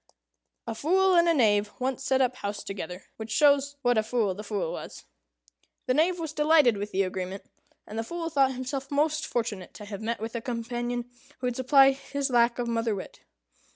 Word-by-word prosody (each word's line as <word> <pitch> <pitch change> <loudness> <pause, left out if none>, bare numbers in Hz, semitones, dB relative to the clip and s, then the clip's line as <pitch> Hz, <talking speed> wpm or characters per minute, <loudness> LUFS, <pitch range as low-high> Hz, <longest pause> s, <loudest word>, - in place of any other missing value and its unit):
A 230 - -3
Fool 370 +10 +3
and 340 0 +5
a - - +5
Knave 210 -5 +3
once 260 0 -2
set 265 0 +2
up 255 -1 +1
house 205 -4 -4
together; 180 -2 -6
which 220 0 -7
shows 285 +3 +3
what 245 -2 +3
a - - +3
fool 220 -3 0
the 205 +3 -8
Fool 205 -6 -2
was. - - -8 0.8
The 255 - +2
Knave 335 +6 +2
was 320 -3 -5
delighted 300 -6 +4
with 205 +1 -5
the 195 +1 +2
agreement; 185 +1 -4 0.4
and 215 +2 -6
the - - -1
Fool 335 +5 -5
thought 270 -3 +3
himself 265 +2 -4
most 305 +2 +1
fortunate 225 -6 -3
to 210 - -9
have 205 0 -7
met 230 +2 -2
with 225 +1 -5
a 235 - -3
companion 240 0 -3 0.3
who 255 - -5
would 245 -1 -1
supply 270 +2 +6
his 275 0 -4
lack 235 -1 +3
of 245 -1 -2
mother 230 -2 0
wit. 190 - -8
245 Hz, 200 wpm, -27 LUFS, 215-280 Hz, 0.8 s, supply